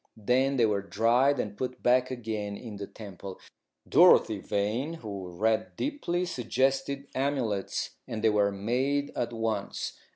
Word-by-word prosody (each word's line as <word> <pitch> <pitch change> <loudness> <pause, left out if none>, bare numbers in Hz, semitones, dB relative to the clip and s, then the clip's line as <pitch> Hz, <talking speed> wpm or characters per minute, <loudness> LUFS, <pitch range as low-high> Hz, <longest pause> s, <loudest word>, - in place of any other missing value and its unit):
Then 130 +5 +2
they 120 - +5
were 105 -2 +1
dried 120 +7 +2
and 105 -3 -3
put 125 +2 -5
back 125 +1 +4
again 110 -5 -4
in 110 -4 -8
the 100 0 -6
temple. 100 -3 -9 0.5
Dorothy - - +6
Vane, 115 +11 -1
who 100 - -7
read 110 +5 0
deeply, 180 - -1
suggested 135 -1 0
amulets, 130 -8 -1 0.2
and 110 -1 -5
they 110 - +5
were 105 -1 +3
made 130 +8 0
at 120 - -1
once. 115 -3 -2
115 Hz, 140 wpm, -29 LUFS, 105-135 Hz, 0.5 s, Dorothy